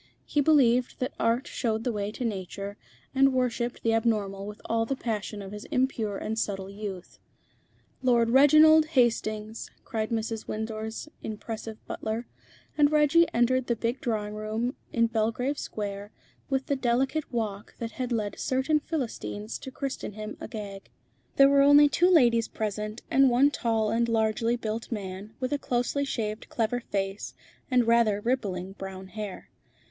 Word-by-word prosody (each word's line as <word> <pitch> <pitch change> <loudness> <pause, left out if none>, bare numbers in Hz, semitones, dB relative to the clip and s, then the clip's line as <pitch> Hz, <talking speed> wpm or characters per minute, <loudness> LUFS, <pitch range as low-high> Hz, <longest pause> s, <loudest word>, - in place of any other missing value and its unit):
He 295 - +1
believed 255 -5 +4
that 255 +2 -2
Art 235 +4 +1
showed 220 -2 -2
the 245 - 0
way 205 -2 -2
to 250 - -4
Nature, 200 -1 -4 0.4
and 270 0 +5
worshipped 245 -1 -1
the 225 - +2
abnormal 205 -3 0
with 210 +1 -8
all 230 0 +1
the 270 +4 -2
passion 210 -4 -4
of 195 - -8
his 210 0 -8
impure 225 -6 0
and 220 +2 -3
subtle 195 -2 -3
youth. 200 -3 -7 0.8
"Lord 235 -3 +3
Reginald 310 +4 +7
Hastings," 220 -2 +1 0.2
cried 220 -1 -2
Mrs. 225 -1 -3
Windsor's 220 +3 -4
impressive 220 0 -6
butler, 220 +2 -4 0.5
and 295 -1 +4
Reggie 305 +3 +5
entered 245 +2 +2
the 235 - +1
big 235 +3 -2
drawing 210 -3 -2
room 215 +4 -2 0.2
in 230 -1 +3
Belgrave 230 +5 0
Square 205 -1 -5 0.4
with 270 -1 0
the 280 - 0
delicate 265 +4 0
walk 215 -4 -3
that 230 -1 -4
had 250 +2 -4
led 210 -3 -2
certain 265 +4 +1
Philistines 115 - -4
to - - -7
christen 270 -5 -5
him 215 +1 -6
Agag. 200 -3 -7 0.5
There 275 - +7
were 280 0 +5
only 290 +1 +8
two 350 +5 +3
ladies 240 -10 +5
present, 215 +1 -4
and 270 0 +6
one 260 +4 +4
tall 225 -5 0
and 235 +1 +1
largely 225 +1 +1
built 225 0 -4
man, 200 0 -6
with 255 +2 -1
a 290 - 0
closely 250 +3 0
shaved, 215 -5 -3
clever 230 +1 0
face, 195 -3 -4 0.3
and 250 -2 +3
rather 230 -3 +3
rippling 205 -6 -2
brown 190 -1 -8
hair. 210 -2 -7
230 Hz, 155 wpm, -27 LUFS, 210-255 Hz, 0.8 s, only